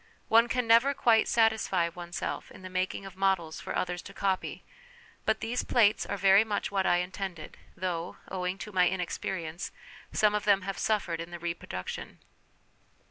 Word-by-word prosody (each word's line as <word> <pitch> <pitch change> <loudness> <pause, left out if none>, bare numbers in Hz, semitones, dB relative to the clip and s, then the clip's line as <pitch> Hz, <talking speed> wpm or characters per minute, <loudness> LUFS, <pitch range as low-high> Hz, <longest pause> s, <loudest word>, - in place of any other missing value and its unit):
One 230 +1 +6
can 250 +1 0
never 235 +5 +5
quite 225 -3 +4
satisfy 220 -6 +2
oneself 175 +1 -5
in - - -13
the 185 - -8
making 185 +1 -2
of 195 -1 -9
models 190 -4 0
for - - -5
others 180 -1 -1
to - - -12
copy, 195 -2 -1 0.6
but 220 0 +2
these 240 +2 -1
plates 220 -3 +3
are 200 - -2
very 195 +2 +6
much 210 -3 -2
what 195 -1 +1
I 175 - +4
intended, 180 -2 -5 0.2
though, 175 -1 -3
owing 185 0 -3
to 210 - -10
my 180 -2 +4
inexperience, 180 -1 -4 0.4
some 210 -1 +3
of 210 - 0
them 200 -2 +4
have 195 0 -4
suffered 180 -6 0
in 165 - -7
the 175 - -6
reproduction. 170 - -5
190 Hz, 170 wpm, -29 LUFS, 175-210 Hz, 0.6 s, One